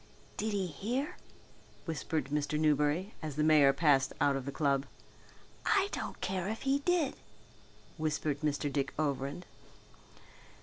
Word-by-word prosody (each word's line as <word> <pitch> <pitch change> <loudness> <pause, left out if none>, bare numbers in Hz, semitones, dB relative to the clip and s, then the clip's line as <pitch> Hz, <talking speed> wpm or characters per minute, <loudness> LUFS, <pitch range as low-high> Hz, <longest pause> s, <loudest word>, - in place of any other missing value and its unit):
"Did 215 0 -2
he 195 -2 0
hear?" 240 - -3 0.7
whispered 155 -3 -2
Mr. 150 0 0
Newberry 150 +6 +2
as 155 -3 -5
the 150 - +1
mayor 150 -3 +6
passed 140 -2 +3
out 140 0 +3
of 135 -2 -3
the - - -2
club. 140 -1 +1 0.8
"I 400 -2 +3
don't - - -4
care 185 -1 -1
if 220 - -4
he 275 +1 +2
did," 335 -1 +1 0.8
whispered 150 -2 -1
Mr. 145 -2 -1
Dick 140 -1 -1
Overend. 145 +2 -2
155 Hz, 135 wpm, -32 LUFS, 140-190 Hz, 0.8 s, mayor